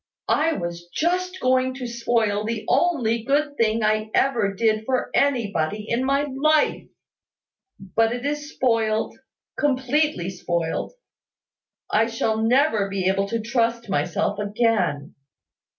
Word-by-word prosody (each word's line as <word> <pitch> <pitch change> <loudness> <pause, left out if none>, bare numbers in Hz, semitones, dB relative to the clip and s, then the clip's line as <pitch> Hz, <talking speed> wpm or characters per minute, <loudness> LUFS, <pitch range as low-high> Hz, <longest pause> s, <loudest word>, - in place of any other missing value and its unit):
I 320 +2 +2
was 175 - -5
just 365 - -1
going 255 0 +1
to 260 -1 -6
spoil 230 -3 0
the 220 0 -3
only 245 -10 +2
good 285 +4 0
thing 225 -3 +1
I 215 0 +1
ever 235 -7 +2
did 220 0 +1
for 255 +2 -1
anybody 210 - 0
in 235 +3 0
my 275 +2 +2
life. 295 +2 +1 0.9
But 225 +4 0
it 245 +2 -4
is 295 +1 -3
spoiled 225 -3 0 0.4
completely 270 - +1
spoiled. 170 - -3 1.0
I 225 +1 +3
shall 225 -1 -1
never 225 -2 +2
be 195 -2 -1
able 195 +1 0
to 230 +2 -2
trust 230 0 -1
myself 180 +4 -1
again. 205 -9 0
230 Hz, 125 wpm, -23 LUFS, 210-265 Hz, 1.0 s, I